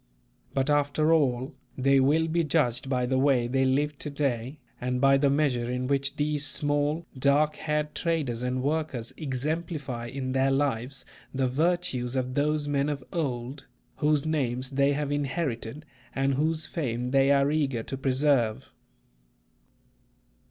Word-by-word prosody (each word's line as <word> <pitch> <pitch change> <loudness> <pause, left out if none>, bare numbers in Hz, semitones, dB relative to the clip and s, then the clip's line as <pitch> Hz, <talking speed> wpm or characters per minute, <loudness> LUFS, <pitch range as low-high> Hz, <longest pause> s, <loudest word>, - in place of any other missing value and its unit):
But 135 0 +1
after 145 +2 +2
all, 130 -4 +1 0.2
they 135 +1 +4
will 150 +5 +3
be 165 +1 +1
judged 135 -5 0
by 125 -2 +1
the 130 +1 +1
way 135 -3 +3
they 130 +2 +1
live 145 +2 0
to 150 - -4
day 140 -2 -2 0.2
and 125 0 -1
by 135 +1 +5
the 140 0 +3
measure 135 -4 +1
in 125 +1 -2
which 140 +1 0
these 150 0 -1
small, 145 +3 0
dark 145 +3 +2
haired 150 -1 -2
traders 150 -9 -1
and 125 +1 -1
workers 145 -5 -2
exemplify 145 -3 -3
in 130 +1 -4
their 135 +1 +2
lives 135 -1 -1 0.3
the 130 -1 +1
virtues 135 -3 0
of 130 -1 -1
those 150 +1 0
men 145 0 +1
of 140 -3 -3
old, 135 -3 -3 0.3
whose 150 -1 +2
names 130 -4 -1
they 140 +1 +2
have 145 0 -2
inherited 145 -2 -3 0.3
and 135 0 +1
whose 155 +3 +1
fame 125 -6 -3
they 135 0 +4
are 140 0 +4
eager 135 -7 0
to 135 - -5
preserve. 135 -4 +1
140 Hz, 150 wpm, -27 LUFS, 130-150 Hz, 0.3 s, by